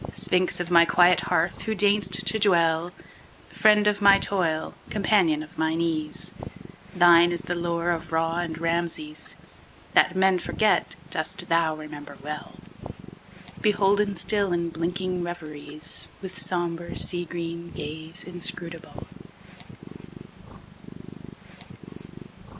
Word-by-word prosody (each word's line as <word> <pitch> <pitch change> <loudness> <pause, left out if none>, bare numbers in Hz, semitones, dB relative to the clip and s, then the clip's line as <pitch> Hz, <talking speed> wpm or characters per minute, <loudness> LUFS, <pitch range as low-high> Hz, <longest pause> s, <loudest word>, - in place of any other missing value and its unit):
Sphinx 180 0 +1
of 175 0 -4
my 170 -1 +7
quiet 175 +1 +4
hearth! 175 0 0
who 220 -1 -2
deign'st 200 -2 +3
to 195 +4 +1
dwellFriend 180 +3 +1
of 210 0 +1
my 200 -1 +7
toil, 165 -5 0 0.2
companion 190 -7 +2
of 155 - -14
mine 160 +1 0
ease, 155 -2 -1 0.6
Thine 175 -1 +6
is 175 0 -1
the 175 - -3
lore 170 0 -1
of 170 0 -4
Ra 165 +1 0
and 165 -2 -4
Rameses; 165 -2 -3 0.6
That 175 - +4
men 190 -1 +3
forget 210 0 0 0.2
dost 175 +2 -3
thou 165 -1 +2
remember 155 -1 -10
well, 150 +1 -7 1.1
Beholden 205 -1 +2
still 200 +2 0
in 170 -1 -1
blinking 180 +2 -3
reveriesWith 160 +2 -7
sombre, 170 -1 -3
sea 175 -1 -1
green 170 0 -6
gaze 160 +4 -7
inscrutable. 170 -1 -3
175 Hz, 110 wpm, -25 LUFS, 165-185 Hz, 1.1 s, my